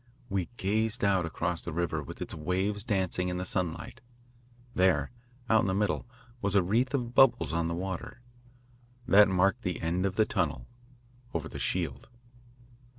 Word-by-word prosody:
We 95 Hz, -4 st, -1 dB
gazed 110 Hz, +4 st, 0 dB
out 95 Hz, -4 st, +3 dB
across 85 Hz, +1 st, -2 dB
the 85 Hz, -, -5 dB
river 80 Hz, -1 st, -1 dB
with 70 Hz, -, -7 dB
its -, -, -7 dB
waves 95 Hz, +6 st, -1 dB
dancing 95 Hz, -4 st, 0 dB
in 90 Hz, -, -2 dB
the 90 Hz, -, -3 dB
sunlight. 90 Hz, +8 st, -3 dB, 0.7 s
There, 90 Hz, -7 st, +2 dB, 0.4 s
out 110 Hz, -1 st, +5 dB
in -, -, 0 dB
the 95 Hz, -, 0 dB
middle, 105 Hz, +3 st, 0 dB, 0.3 s
was 100 Hz, 0 st, 0 dB
a 100 Hz, -, +5 dB
wreath 120 Hz, +9 st, +1 dB
of 120 Hz, -3 st, -2 dB
bubbles 120 Hz, -, +4 dB
on 85 Hz, 0 st, 0 dB
the 85 Hz, -, -2 dB
water. 95 Hz, +6 st, -5 dB, 0.9 s
That 105 Hz, -2 st, +7 dB
marked 95 Hz, +5 st, +2 dB
the 90 Hz, -4 st, -3 dB
end 90 Hz, +4 st, 0 dB
of 95 Hz, -, -4 dB
the 110 Hz, -, +4 dB
tunnel, -, -, -1 dB, 0.7 s
over -, -, -2 dB
the -, -, -8 dB
shield. -, -, -2 dB
95 Hz, 165 wpm, -29 LUFS, 85-105 Hz, 0.9 s, That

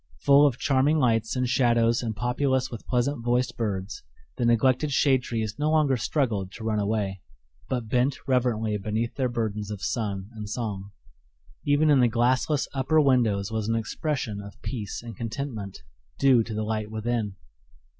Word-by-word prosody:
Full 140 Hz, +1 st, +6 dB
of 130 Hz, -4 st, -1 dB
charming 140 Hz, +3 st, +2 dB
lights 115 Hz, -5 st, +1 dB
and 125 Hz, 0 st, 0 dB
shadows 120 Hz, -2 st, +3 dB
and 115 Hz, -3 st, -3 dB
populous 130 Hz, +3 st, 0 dB
with 115 Hz, -, -8 dB
pleasant 125 Hz, +1 st, 0 dB
voiced 120 Hz, +1 st, +1 dB
birds, 100 Hz, -3 st, -3 dB, 0.3 s
the 120 Hz, -, -1 dB
neglected 130 Hz, +5 st, +3 dB
shade 135 Hz, -2 st, +3 dB
trees 110 Hz, -3 st, -4 dB
no 150 Hz, +1 st, +1 dB
longer 155 Hz, -4 st, +3 dB
struggled 110 Hz, -7 st, -1 dB
to 110 Hz, -, -9 dB
run 110 Hz, -1 st, 0 dB
away, 100 Hz, -2 st, -1 dB, 0.5 s
but 125 Hz, -4 st, -2 dB
bent 125 Hz, +4 st, +1 dB
reverently 120 Hz, -4 st, +1 dB
beneath 110 Hz, +3 st, -2 dB
their 130 Hz, -2 st, -1 dB
burdens 110 Hz, -3 st, -3 dB
of 105 Hz, -2 st, -6 dB
sun 100 Hz, -3 st, -3 dB
and 105 Hz, -2 st, -7 dB
song. 105 Hz, -4 st, -4 dB, 0.8 s
Even 145 Hz, +2 st, +4 dB
in 140 Hz, -, +5 dB
the 125 Hz, -, +5 dB
glassless 130 Hz, +5 st, +1 dB
upper 140 Hz, +4 st, +2 dB
windows 115 Hz, -8 st, +2 dB
was 110 Hz, -1 st, -2 dB
an 115 Hz, -, +1 dB
expression 115 Hz, -2 st, -3 dB
of 100 Hz, +4 st, -12 dB
peace 110 Hz, -4 st, -5 dB
and 115 Hz, -1 st, -8 dB
contentment, 115 Hz, -, -5 dB, 0.3 s
due 130 Hz, -4 st, +5 dB
to 110 Hz, -, -6 dB
the 110 Hz, -, -1 dB
light 110 Hz, -1 st, -2 dB
within. 110 Hz, -2 st, -2 dB
120 Hz, 165 wpm, -26 LUFS, 110-130 Hz, 0.8 s, Full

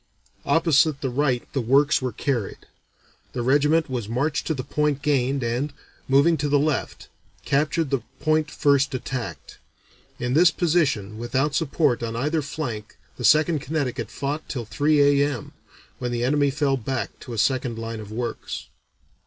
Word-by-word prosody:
Opposite 155 Hz, -3 st, +3 dB
the 130 Hz, -, -2 dB
right 130 Hz, -2 st, +1 dB
the 135 Hz, -, 0 dB
works 140 Hz, +6 st, +3 dB
were 130 Hz, -1 st, -2 dB
carried. 120 Hz, -2 st, -2 dB, 0.8 s
The 120 Hz, -, -2 dB
regiment 150 Hz, +5 st, +3 dB
was 120 Hz, -6 st, -4 dB
marched 140 Hz, +6 st, -1 dB
to 160 Hz, -, 0 dB
the 130 Hz, -, -4 dB
point 150 Hz, 0 st, -1 dB
gained 135 Hz, -2 st, +1 dB
and, 120 Hz, +5 st, -1 dB, 0.4 s
moving 140 Hz, +5 st, +4 dB
to 145 Hz, 0 st, -1 dB
the 145 Hz, -, +4 dB
left, 145 Hz, -1 st, -1 dB, 0.4 s
captured 150 Hz, +1 st, +1 dB
the 135 Hz, -3 st, +1 dB, 0.2 s
point 155 Hz, -1 st, +1 dB
first 140 Hz, -1 st, +2 dB
attacked. 125 Hz, -1 st, -6 dB, 0.6 s
In 125 Hz, 0 st, -2 dB
this 170 Hz, +4 st, +6 dB
position 150 Hz, -, 0 dB
without 130 Hz, +5 st, 0 dB
support 145 Hz, -4 st, +1 dB
on 115 Hz, -1 st, -3 dB
either 150 Hz, +6 st, 0 dB
flank 125 Hz, -7 st, -5 dB, 0.2 s
the -, -, -6 dB
Second 155 Hz, +1 st, +4 dB
Connecticut 140 Hz, -3 st, -3 dB
fought 145 Hz, +3 st, -4 dB
till 120 Hz, -4 st, -4 dB
three 145 Hz, +2 st, +3 dB
A.M., 140 Hz, -6 st, -2 dB, 0.5 s
when 125 Hz, -1 st, -3 dB
the 120 Hz, 0 st, -1 dB
enemy 140 Hz, +2 st, +2 dB
fell 140 Hz, -1 st, +1 dB
back 130 Hz, +1 st, -4 dB
to 125 Hz, -, -8 dB
a -, -, -5 dB
second 125 Hz, 0 st, +1 dB
line 115 Hz, 0 st, -5 dB
of 105 Hz, -1 st, -9 dB
works." 120 Hz, +1 st, -5 dB
140 Hz, 160 wpm, -24 LUFS, 125-150 Hz, 0.8 s, this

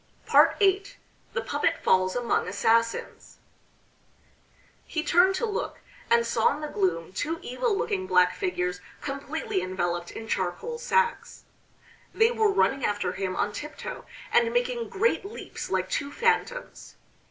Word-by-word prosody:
VIII 395 Hz, 0 st, +4 dB, 0.4 s
THE 485 Hz, -, -1 dB
PUPPET -, -, 0 dB
FALLS 185 Hz, 0 st, +3 dB
AMONG 245 Hz, -5 st, 0 dB
ASSASSINS 230 Hz, +4 st, 0 dB, 1.5 s
He 315 Hz, -, -2 dB
turned 365 Hz, +3 st, +4 dB
to 470 Hz, -, 0 dB
look, 430 Hz, -2 st, -4 dB, 0.3 s
and 235 Hz, 0 st, +4 dB
saw 230 Hz, -1 st, +2 dB
in 300 Hz, -, -8 dB
the 300 Hz, -, -3 dB
gloom 180 Hz, -, -1 dB
two 320 Hz, +9 st, -2 dB
evil 395 Hz, -, -1 dB
looking 405 Hz, -4 st, -1 dB
black 180 Hz, -, +4 dB
figures 180 Hz, -, -2 dB, 0.2 s
completely 275 Hz, -6 st, -3 dB
enveloped 175 Hz, -2 st, -2 dB
in 225 Hz, -, -8 dB
charcoal 210 Hz, -, -2 dB
sacks. 475 Hz, 0 st, 0 dB, 0.7 s
They 450 Hz, +1 st, +4 dB
were 440 Hz, -3 st, +2 dB
running 275 Hz, -9 st, +2 dB
after 205 Hz, -3 st, 0 dB
him 185 Hz, 0 st, -3 dB
on 205 Hz, -, 0 dB
tiptoe, 300 Hz, -, -7 dB, 0.3 s
and 470 Hz, 0 st, +4 dB
making 485 Hz, -1 st, -1 dB
great 455 Hz, +1 st, +1 dB
leaps 400 Hz, +3 st, -7 dB
like -, -, 0 dB
two 285 Hz, 0 st, -2 dB
phantoms. 480 Hz, +4 st, -1 dB
300 Hz, 135 wpm, -27 LUFS, -, 1.5 s, VIII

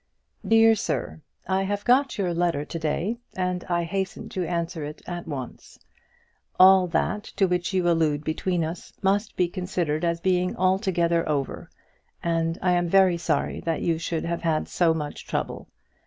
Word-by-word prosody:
DEAR 225 Hz, 0 st, +6 dB
SIR, 195 Hz, -6 st, -3 dB, 0.3 s
I 190 Hz, 0 st, +1 dB
have 205 Hz, +1 st, -2 dB
got 260 Hz, +2 st, +3 dB
your 185 Hz, -4 st, 0 dB
letter 170 Hz, -4 st, 0 dB
to 165 Hz, -, -5 dB
day, 170 Hz, +9 st, -1 dB, 0.2 s
and 180 Hz, -1 st, -1 dB
I 175 Hz, -1 st, 0 dB
hasten 190 Hz, +2 st, -3 dB
to 185 Hz, -, -3 dB
answer 170 Hz, -2 st, -3 dB
it 150 Hz, +1 st, -8 dB
at 175 Hz, -1 st, -6 dB
once. 135 Hz, -5 st, -7 dB, 0.8 s
All 185 Hz, 0 st, +7 dB
that 190 Hz, +5 st, -1 dB
to 195 Hz, -, +3 dB
which 180 Hz, 0 st, -1 dB
you 185 Hz, -2 st, +1 dB
allude 155 Hz, -3 st, +2 dB
between 170 Hz, +2 st, -1 dB
us 165 Hz, +3 st, -6 dB
must 200 Hz, +2 st, +1 dB
be 180 Hz, -, +2 dB
considered 175 Hz, -4 st, -2 dB
as 170 Hz, 0 st, 0 dB
being 180 Hz, 0 st, +1 dB
altogether 175 Hz, -3 st, +1 dB
over, 140 Hz, -3 st, -2 dB, 0.5 s
and 165 Hz, 0 st, 0 dB
I 180 Hz, -, +3 dB
am 175 Hz, -1 st, +1 dB
very 190 Hz, -1 st, +5 dB
sorry 170 Hz, -, -1 dB
that 165 Hz, -1 st, -2 dB
you 165 Hz, -2 st, +1 dB
should 165 Hz, -1 st, -2 dB
have 170 Hz, 0 st, -2 dB
had 160 Hz, -2 st, 0 dB
so 165 Hz, -2 st, +2 dB
much 150 Hz, -2 st, -5 dB
trouble. -, -, -3 dB
175 Hz, 170 wpm, -25 LUFS, 165-190 Hz, 0.8 s, All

